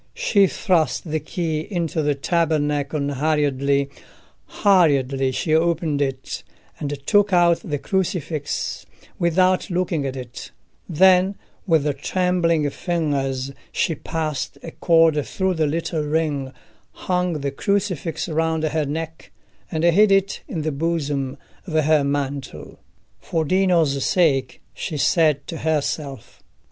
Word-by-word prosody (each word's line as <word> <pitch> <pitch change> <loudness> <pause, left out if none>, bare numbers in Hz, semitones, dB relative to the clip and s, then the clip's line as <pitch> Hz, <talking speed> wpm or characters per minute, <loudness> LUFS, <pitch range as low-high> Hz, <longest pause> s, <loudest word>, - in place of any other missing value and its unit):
She 215 - +3
thrust 170 -3 0
the 155 - 0
key 160 +1 -3
into 165 -1 -2
the 145 -1 +1
tabernacle 145 -2 0
hurriedly: 140 -1 +1 0.6
hurriedly 140 -9 +2
she 155 +4 -1
opened 160 -2 +1
it, 135 -2 -3 0.4
and 145 - -3 0.2
took 205 0 +3
out 175 -2 +4
the 150 -3 -2
crucifix, 165 -4 -2 0.3
without 185 +2 +2
looking 175 -5 -1
at 130 - -4
it; 125 -1 -8 0.4
then, 185 +3 +4 0.3
with 150 -4 +2
trembling 175 -4 +1
fingers, 140 -6 -2 0.2
she 165 - 0
passed 155 -2 -4
a 165 - -7
cord 165 -3 +3
through 190 +4 -1
the 160 -3 +1
little 160 +1 -2
ring, 150 -3 -1 0.5
hung 180 -1 +1
the 140 0 -2
crucifix 185 0 -1
round 160 0 0
her 155 -1 0
neck, 160 +2 -5 0.4
and 160 0 -2
hid 195 +5 +5
it 195 0 +2
in 170 - -4
the 155 - -1
bosom 145 -3 -2 0.3
of 165 - -6
her 155 -1 +3
mantle. 140 - -4 0.4
"For 160 -1 -2
Dino's 170 -6 +2
sake," 135 -8 +1
she 155 - -5
said 150 -1 +2
to 165 - -6
herself. 150 -3 -3
160 Hz, 125 wpm, -22 LUFS, 145-175 Hz, 0.6 s, hid